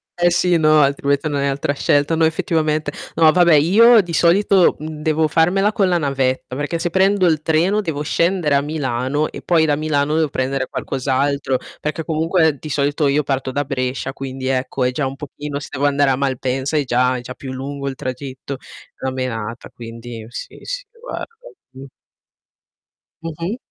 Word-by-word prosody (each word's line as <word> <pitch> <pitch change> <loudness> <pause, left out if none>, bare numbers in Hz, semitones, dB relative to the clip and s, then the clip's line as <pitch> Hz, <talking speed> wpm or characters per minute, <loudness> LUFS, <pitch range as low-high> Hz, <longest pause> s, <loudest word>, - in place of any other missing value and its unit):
Eh 175 0 +3
sì, 175 0 +2
no 155 -1 +4
altrimenti 140 +1 +1
non 145 -2 -1
hai 140 - +1
altra 140 +1 -1
scelta. 145 +2 +1
No, 165 - +1
effettivamente. 155 -2 0 0.2
No 160 -1 +6
vabbè 175 -2 +5
io 220 +10 +6
di 175 -3 -7
solito 185 +2 +4
devo 155 0 -1
farmela 185 +7 +2
con 195 -3 +1
la 175 - +2
navetta, 135 -3 -1
perché 145 +4 -2
se 175 0 -2
prendo 190 0 +3
il 155 -3 +2
treno 170 +7 +2
devo 155 -6 -3
scendere 170 0 +1
a 140 - +4
Milano 145 -1 -1
e - - -8
poi 165 -2 +3
da 150 -2 +2
Milano 150 -1 0
devo 160 -2 +1
prendere 135 +1 -2
qualcos'altro, 135 0 -1 0.2
perché 155 +2 -3
comunque 160 -1 +1
di 155 - -8
solito 145 +1 +1
io 145 +2 +2
parto 135 -1 -2
da 145 +2 -1
Brescia, 130 0 -3
quindi 135 -1 -6
ecco 130 0 -1
è 125 - +2
già 135 +1 -1
un 135 - -6
pochino 145 0 -6
se 145 - -9
devo 145 0 0
andare 140 -1 +2
a - - +2
Malpensa 135 +2 -1
è 145 - +2
già 125 +1 +2
è - - -6
già 125 +1 -8
più 130 0 -8
lungo 140 +1 -4
il 135 - -6
tragitto, 135 0 -6 0.4
una 130 - -1
menata, 120 -3 -4
quindi 115 -1 -9
sì, - - -8
sì - - -5 0.2
guarda, - - -5 0.5
mh. 130 +1 -11 1.4
Mh 165 - -3
mh. 190 +8 -2
145 Hz, 180 wpm, -19 LUFS, 135-160 Hz, 1.4 s, No